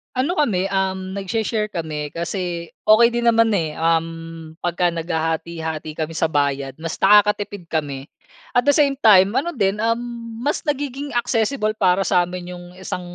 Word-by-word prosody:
Ano 280 +9 0
kami 195 -10 +1
um, 190 0 -2
nagsha-share 215 +2 -2
kami. 150 -3 -4
Kasi 170 0 -4 0.2
okey 230 +2 +6
din 240 0 -2
naman, 230 -1 +4
eh. 165 -7 0
Um, 165 0 -2
pagka 175 0 0
naghahati-hati 160 -1 -3
kami 160 0 -3
sa 160 0 0
bayad, 140 -3 -1
mas 165 +1 -5
nakakatipid 205 -1 +3
kami. 145 -5 -3 0.5
At 245 - +4
the 285 +3 +3
same 285 -2 +4
time, 200 -2 +6
ano 290 +8 0
din, 200 0 +1
um, 230 +1 +2 0.4
mas 285 +6 -1
nagiging 285 -1 -3
accessible 225 -1 0
para 195 -2 +2
sa 180 - +3
amin 180 0 -7
'yong 175 0 -10
isang 185 -1 -5
185 Hz, 155 wpm, -21 LUFS, 165-220 Hz, 0.5 s, okey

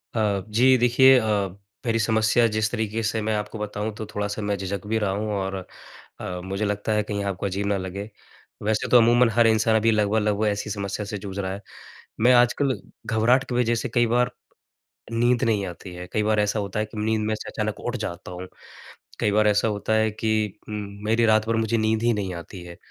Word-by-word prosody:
अ, 105 -3 +1
जी 125 +4 +5
देखिए 130 +2 +6
अ, 110 - -2 0.6
मेरी 115 -1 +1
समस्या 110 +1 +3
जिस 110 0 +1
तरीके 110 -1 -2
से 110 +1 -1
मैं 110 0 0
आपको 105 +1 -4
बताऊँ 105 +1 -3
तो 110 - -6
थोड़ा-सा 105 +1 -3
मैं 105 0 -1
झिझक 100 +2 -4
भी 110 +1 0
रहा 100 -3 0
हूँ 105 +2 -2
और 95 -1 -2 0.6
अ, 90 0 -5
मुझे 95 +3 -2
लगता 105 +1 -2
है 105 0 +1
कहीं 100 0 -3
आपको 100 -2 -3
अजीब 100 +1 -2
ना 100 -1 +1
लगे 95 +2 -5 0.5
वैसे 110 +1 0
तो 125 - +7
अमूमन 120 +1 +5
हर 115 +1 +4
इंसान 110 0 +3
अभी 110 +1 +3
लगभग-लगभग 105 0 +1
ऐसी 105 0 -2
समस्या 100 0 -3
से 105 +1 -5
जूझ 95 0 -7
रहा 95 -1 -2
है। 100 - -7 0.6
मैं 125 +3 +6
आजकल 125 +3 +3 0.3
घबराहट 115 +4 +3
की 125 - -2
वज़ह 120 -1 +2
से 125 +3 -3
कई 120 -1 +4
बार 125 +2 +2 0.8
नींद 120 +2 +2
नहीं 105 -4 +1
आती 90 +1 -9
है 90 0 -7
कई 110 - +1
बार 105 0 +2
ऐसा 105 +1 0
होता 100 0 -2
है 110 - -1
कि 110 0 -10
नींद 110 0 0
में 110 - 0
से 110 - -7
अचानक - - -3
उठ - - -3
जाता 85 +1 -6
हूँ। 90 +1 -7 0.7
कई 105 - +2
बार 105 +1 +4
ऐसा 105 +2 +2
होता 105 +1 -2
है 110 0 +2
कि 110 -2 -1
उम, 105 - -5 0.3
मेरी 115 +2 +2
रात 110 0 +3
भर 115 - +1
मुझे 115 0 +1
नींद 110 0 +1
ही 120 0 +3
नहीं 100 -3 -3
आती 85 +2 -9
है 85 0 -10
110 Hz, 215 wpm, -24 LUFS, 100-115 Hz, 0.8 s, तो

